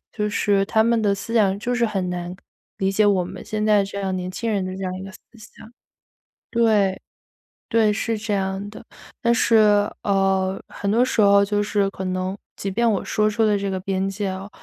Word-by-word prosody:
就 210 -2 -2
是 205 -1 +1
他 220 +2 +2
们 235 0 +2
的 205 -2 +2
思 200 +3 -7
想 200 -4 +3
就 245 +3 -2
是 240 -1 +2
很 190 -4 -2
难 175 0 -5
感 - - -16 0.4
理 190 0 0
解 215 +2 +3
我 190 -3 +2
们 - - -9
现 215 0 -3
在 210 -2 +4
这 200 0 -7
样 190 -1 -2
年 180 0 -4
轻 230 +5 -4
人 200 -3 0
的 185 - -4
这 195 - -7
样 185 - -2
一 185 - -7
个 195 - -8
思 - - -13 0.2
想。 220 0 -14 0.8
对， 215 -5 +2 0.7
对， 225 -2 +3
是 225 +2 -2
这 210 0 -3
样 195 +1 -2
的。 - - -10 0.4
但 235 0 +3
是， 230 0 +3 0.5
呃， 195 -1 +1
很 200 - -4
多 230 +4 +3
时 255 - -2
候 200 0 +6
就 205 0 0
是 205 -1 0
可 190 - -6
能， 185 +1 -2 0.2
即 195 - -4
便 235 +4 +2
我 200 - -1
说 215 0 +1
出 220 +2 0
了 210 -1 +3
这 200 0 -2
个 190 - -2
边 195 0 -1
界 195 0 -3
哦， 190 +2 -6
200 Hz, 240 characters per minute, -22 LUFS, 190-215 Hz, 0.8 s, 候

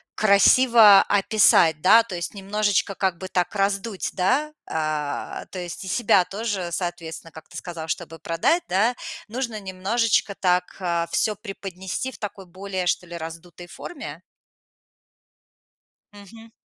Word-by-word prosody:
красиво 215 0 +6
описать, 195 -6 +4
да, 225 +5 +6
то 200 -6 -7
есть 170 0 -4
немножечко 200 0 -1
как 190 -3 -1
бы 190 - -7
так 180 0 -1
раздуть, 200 +1 -1
да, 275 +11 0
а, 155 -2 -3
то 185 - -6
есть 175 +2 -6
и 190 - -8
себя 200 -5 +3
тоже, 200 -3 -3
соответственно, 170 -2 -5
как 160 - -13
ты - - -10
сказал, 165 -3 -7
чтобы 165 -1 -4
продать, 165 - +1
да, 215 +7 +2 0.3
нужно 235 -1 -4
немножечко 200 +3 0
так, 180 -1 +1
а, 170 -2 -1
всё 215 - +1
преподнести 195 +3 -6
в - - -12
такой 200 -2 -7
более, 185 0 -5
что 175 - 0
ли, 170 0 -7
раздутой 165 +2 -9
форме? 350 - -9 1.9
Мгм. 225 +3 -14
190 Hz, 135 wpm, -23 LUFS, 175-215 Hz, 1.9 s, красиво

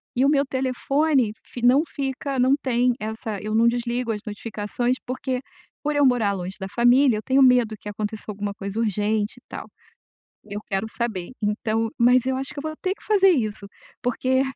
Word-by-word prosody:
e 255 - +2
o 280 - +4
meu 280 -1 +3
telefone 265 0 +1
fi 245 - -8
não 260 +4 +6
fica 270 0 -3
não 260 +2 +4
tem 250 -1 +2
essa 220 -1 -4
eu 215 +1 -2
não 230 +1 +5
desligo 240 0 0
as 210 -1 -3
notificações, 220 +3 -2
porque 255 0 -3 0.4
por 300 0 0
eu 290 -1 +4
morar 230 -6 +3
longe 185 0 -5
da 190 - -4
família 245 +1 +4
eu 215 - -6
tenho 270 +1 +3
medo 245 -4 +4
que 210 - -7
aconteça 210 +1 -5
alguma 205 -1 -4
coisa 200 +2 -5
urgente, 210 0 0
e - - -41
tal, - - -7 0.8
eu 205 0 -5
quero 195 +3 -1
saber. 220 -7 -3
então 220 +2 0
mas 250 +1 +4
eu 260 0 0
acho 270 +1 -4
que 285 - -6
eu - - -7
vou 310 0 -4
ter 375 0 0
que - - -21
fazer 390 -3 +5
isso, 215 - -1 0.4
porque 260 +2 +1
240 Hz, 195 wpm, -24 LUFS, 215-260 Hz, 0.8 s, não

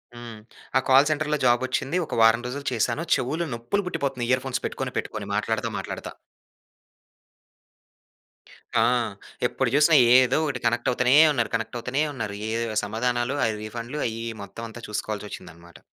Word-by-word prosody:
హ్మ్. 120 -2 -9 0.4
ఆ - - +5
కాల్ 135 +3 +6
సెంటర్‌లో 150 0 0
జాబొచ్చింది. 130 +5 +1
ఒక - - -8
వారం 115 +1 +5
రోజులు 140 +3 -6
చేశాను. 120 +7 0
చెవులు 150 +6 -2
నొప్పులు 120 +13 -2
పుట్టిపోతున్నయి 135 -7 -2
ఇయర్ 130 0 +2
ఫోన్స్ 130 - -3
పెట్టుకొని, - - -3
పెట్టుకొని, - - -4
మాట్లాడతా, - - -1
మాట్లాడతా. - - -6 2.7
ఆ! - - +5 0.7
ఎప్పుడు 130 0 -1
చూసినా 150 +2 +5 0.2
ఏదో 130 +1 +4
ఒకటి 135 -4 -2
కనెక్టవుతానే 120 +2 +2 0.2
ఉన్నారు, 120 -3 0
కనెక్టవుతానే 120 +5 -2
ఉన్నారు. 110 -6 -4
ఏదొవ 115 -1 -2
సమాధానాలు, 120 +4 -1
ఆ - - +3
రీఫండ్‌లు 115 +6 -6
అయ్యి, 115 0 -5
ఇయ్యి 115 -1 -5
మొత్తవంతా 115 +3 -9
చూసుకోవాల్సొచ్చిందనమాట. 90 -7 -6
120 Hz, 130 wpm, -25 LUFS, 115-135 Hz, 2.7 s, కాల్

